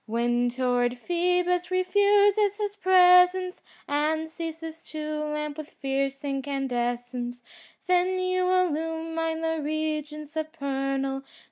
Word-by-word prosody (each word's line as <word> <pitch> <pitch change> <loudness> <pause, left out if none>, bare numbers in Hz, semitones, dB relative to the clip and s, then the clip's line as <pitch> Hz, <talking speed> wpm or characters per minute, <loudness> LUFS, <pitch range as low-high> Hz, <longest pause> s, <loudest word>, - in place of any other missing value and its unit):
When 240 +2 +1
torrid 245 0 0
Phoebus 360 +4 0
refuses 405 +2 +3
his 410 -1 -3
presence 365 -1 +5 0.3
And 310 +2 0
ceases 325 0 -7
to 305 -1 -4
lamp 300 0 -4
with 310 0 -7
fierce 275 0 -2
incandescence^ 245 -3 -3 0.4
Then 365 0 +2
you 370 0 0
illumine 325 -2 0
the 325 0 -1
regions 305 0 -3
supernal. 275 -4 -2
315 Hz, 100 wpm, -26 LUFS, 275-360 Hz, 0.4 s, presence